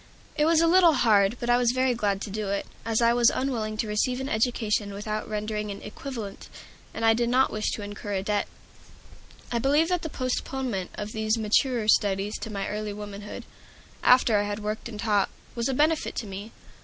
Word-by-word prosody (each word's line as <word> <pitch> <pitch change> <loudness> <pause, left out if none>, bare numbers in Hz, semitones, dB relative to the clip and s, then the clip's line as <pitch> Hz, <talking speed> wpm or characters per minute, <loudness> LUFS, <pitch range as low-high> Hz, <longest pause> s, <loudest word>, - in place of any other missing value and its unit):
It 300 - +2
was 325 0 +4
a 335 - +4
little 345 -1 +6
hard, 215 -4 +3
but 240 - -4
I 240 0 +4
was 245 -1 +2
very 255 0 +2
glad 205 -4 -1
to 210 - -5
do 210 0 -3
it, 200 0 -1 0.2
as 225 +1 +1
I 235 0 +5
was 240 -1 +5
unwilling 225 -5 -2
to 220 - -1
receive 230 +4 0
an 265 +1 -4
education 215 -3 0
without 215 +2 -4
rendering 210 0 -3
an 200 - -5
equivalent, 220 -3 -7 0.4
and 225 - -3
I 225 - +6
did 235 +1 0
not 260 +2 +3
wish 215 0 -1
to 210 - -5
incur 205 0 -6
a 190 -1 -1
debt. 205 0 0 1.0
I 235 - +1
believe 290 +7 +3
that 360 -2 +1
the 320 - -4
postponement 255 -6 -3
of 210 0 -5
these 220 +1 0
maturer 225 +1 +1
studies 200 0 +2
to 220 - -6
my 200 -1 -3
early 210 0 -3
womanhood, 205 0 -8 0.6
after 245 -4 +5
I - - +1
had 205 0 -3
worked 215 +2 -4
and 215 -3 -8
taught, 205 -2 +2 0.2
was 235 +2 -1
a - - 0
benefit 310 +3 +1
to 230 - -3
me. 200 +2 -7
220 Hz, 205 wpm, -26 LUFS, 210-250 Hz, 1.0 s, little